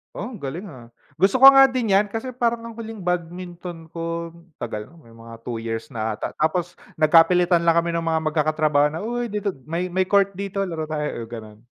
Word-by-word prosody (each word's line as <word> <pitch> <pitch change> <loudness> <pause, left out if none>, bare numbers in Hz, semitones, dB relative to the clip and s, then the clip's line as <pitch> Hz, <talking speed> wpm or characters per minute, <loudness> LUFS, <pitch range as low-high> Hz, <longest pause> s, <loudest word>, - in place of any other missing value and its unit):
Oh, 220 +3 -6
galing, 170 +7 -6
ah. 120 -5 -14 0.2
Gusto 200 +7 +2
ko 270 - +13
nga 270 0 +8
din 255 -5 -1
'yan 195 +2 +4
kasi 225 +5 -5
parang 235 -2 -1
ang 230 -1 -9
huling 225 -2 -7
badminton 175 -1 -5
ko 170 0 -4 0.3
tagal 105 -3 -4
na, - - -20
may 115 - -19
mga 115 0 -13
2 120 0 -5
years 115 0 -5
na 110 -1 -3
'ata. 105 - -4
Tapos 175 +3 -1 0.2
nagkapilitan 170 +2 +5
lang 165 - +5
kami 170 +1 +1
ng 170 -1 -2
mga 160 -1 +1
magkakatrabaho 155 -1 +2
na, 160 - -4
"Uy, 240 +3 -2
dito 210 -2 -2 0.2
may 170 +4 -3
may 185 +1 +1
court 200 +1 +3
dito, 195 0 -3
laro 160 -2 -3
tayo," 150 -6 -4
gano'n. 110 -1 -11
170 Hz, 200 wpm, -23 LUFS, 150-200 Hz, 0.3 s, ko